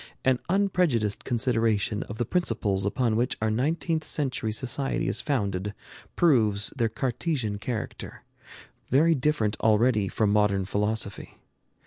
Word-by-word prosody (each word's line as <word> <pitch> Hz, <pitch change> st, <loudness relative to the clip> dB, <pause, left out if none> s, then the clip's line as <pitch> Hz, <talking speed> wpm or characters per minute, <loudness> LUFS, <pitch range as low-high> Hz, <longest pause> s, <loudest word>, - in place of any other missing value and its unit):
An 130 Hz, -1 st, +3 dB
unprejudiced 175 Hz, -, +1 dB
consideration 115 Hz, -4 st, +1 dB
of 105 Hz, -, -7 dB
the 120 Hz, -, -1 dB
principles 100 Hz, -, 0 dB
upon 115 Hz, +1 st, 0 dB
which 120 Hz, +2 st, 0 dB
our 110 Hz, 0 st, 0 dB
nineteenth 160 Hz, +6 st, 0 dB
century 130 Hz, -8 st, -1 dB
society 130 Hz, +4 st, -1 dB
is -, -, -1 dB
founded 100 Hz, -7 st, -2 dB, 0.4 s
proves 110 Hz, -11 st, +3 dB
their 115 Hz, -4 st, +1 dB
Cartesian 125 Hz, -2 st, -2 dB
character, 110 Hz, +1 st, -5 dB, 0.7 s
very 155 Hz, +6 st, +4 dB
different 130 Hz, -7 st, 0 dB
already 110 Hz, -1 st, +3 dB
from 105 Hz, +2 st, 0 dB
modern 105 Hz, -2 st, +2 dB
philosophy. 105 Hz, 0 st, -2 dB
115 Hz, 120 wpm, -26 LUFS, 105-135 Hz, 0.7 s, very